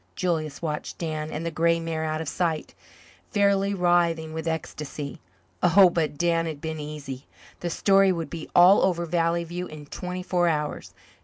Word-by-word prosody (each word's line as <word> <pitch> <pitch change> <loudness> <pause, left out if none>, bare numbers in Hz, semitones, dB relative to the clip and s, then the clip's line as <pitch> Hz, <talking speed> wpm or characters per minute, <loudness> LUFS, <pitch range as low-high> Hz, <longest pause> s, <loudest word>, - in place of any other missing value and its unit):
Julius 160 -4 -2
watched 150 -2 -4
Dan 155 -2 -3
and 155 +2 -4
the 170 - -2
grey 165 +1 +2
mare 165 -1 -3
out 155 0 -2
of 160 - -5
sight, 165 -1 -2 0.6
fairly 200 -1 +2
writhing 170 -3 +2
with 160 +1 -4
ecstasy. 150 -3 -5 0.4
Oh, 180 +1 +6
but 155 -4 -1
Dan 165 0 +1
had 155 -3 -5
been 160 +1 -4
easy! 145 -3 -7 0.3
The 175 - -3
story 195 +2 +4
would 165 -3 -3
be 165 -2 -6
all 180 +3 +7
over 170 -2 +1
Valley 170 0 +1
View 175 +2 -5
in 155 -1 -10
twenty 180 +4 -5
four 180 -1 +1
hours. 150 -2 -2
165 Hz, 170 wpm, -25 LUFS, 155-175 Hz, 0.6 s, all